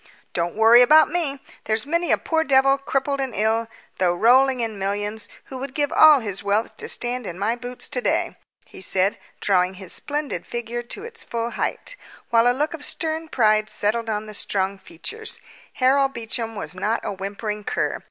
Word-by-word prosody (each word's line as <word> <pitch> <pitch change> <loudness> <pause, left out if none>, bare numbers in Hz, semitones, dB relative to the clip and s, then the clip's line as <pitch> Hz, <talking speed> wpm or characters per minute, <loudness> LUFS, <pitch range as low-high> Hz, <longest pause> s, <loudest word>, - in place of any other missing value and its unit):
"Don't 170 0 -2
worry 225 +2 +7
about 305 +4 +6
me. 295 -6 -2 0.2
There's 220 +2 0
many 335 +3 0
a - - +5
poor 320 -1 0
devil, 275 -1 +4
crippled 275 0 -1
and 265 -3 -3
ill, 220 +2 +1 0.3
though 175 -2 +2
rolling 255 +6 +4
in 225 -3 -3
millions, 205 +2 -3
who 260 - -8
would 270 0 -6
give 290 0 0
all 305 -4 +7
his 200 -4 -4
wealth 205 +3 0
to - - -6
stand 245 -2 -2
in 175 - -6
my 210 +4 0
boots 245 +1 -5
today," - - -1 0.3
he - - -13
said, 190 +1 +1 0.2
drawing 185 -1 +2
his 185 -2 -4
splendid 295 0 -2
figure 240 0 -4
to 240 +12 -7
its 460 0 -9
full 235 0 -3
height, - - -3 0.4
while 230 0 +5
a 245 +1 +2
look 300 +3 0
of 315 -3 -7
stern 320 +1 -3
pride 215 -6 +2
settled 225 +2 -1
on 210 0 -2
the 215 - -9
strong 195 -1 -1
features. 440 - -7 0.3
Harold 270 +1 +3
Beecham 225 -1 -4
was 160 -6 -4
not 210 +5 -1
a 205 - -3
whimpering 205 +2 -5
cur. - - -1
235 Hz, 185 wpm, -23 LUFS, 210-275 Hz, 0.4 s, worry